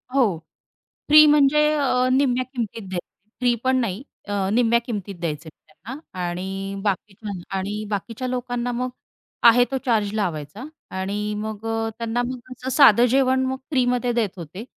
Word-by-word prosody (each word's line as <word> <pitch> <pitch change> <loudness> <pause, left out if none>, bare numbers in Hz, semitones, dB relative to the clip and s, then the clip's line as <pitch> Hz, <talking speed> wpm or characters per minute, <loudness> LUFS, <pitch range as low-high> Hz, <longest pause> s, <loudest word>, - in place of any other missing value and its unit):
हो. 220 -11 +3 0.7
फ्री 305 +1 +9
म्हणजे 300 0 +5
अ, 255 -3 +2
निम्म्या 255 -1 +2
किंमतीत 230 -5 -5
द्यायचे 185 +2 -8
फ्री 245 -1 +3
पण 260 0 +2
नाही 215 +1 -3 0.2
अ, 200 -2 -1
निम्म्या 235 0 +3
किंमतीत 205 -4 -5
द्यायचे 160 -1 -4
त्यांना 205 - -12 0.3
आणि 190 +3 -4
बाकीच्या 205 +1 -3 0.3
आणि 205 +3 -3
बाकीच्या 225 +5 -4
लोकांना 245 -1 -2
मग 250 +1 -2 0.6
आहे 245 +2 +5
तो 270 - 0
चार्ज 215 -4 +1
लावायचा 175 - -3 0.4
आणि 205 +2 -2
मग 215 0 -5
अ, 225 0 -1
त्यांना 230 +1 -1
मग 255 0 -8
असं 255 +1 -6
साधं 245 -4 +6
जेवण 260 0 +3
मग 265 0 -2
फ्रीमध्ये 250 -2 +1
देत 230 -4 +1
होते. 170 +5 -8
230 Hz, 150 wpm, -23 LUFS, 200-255 Hz, 0.7 s, फ्री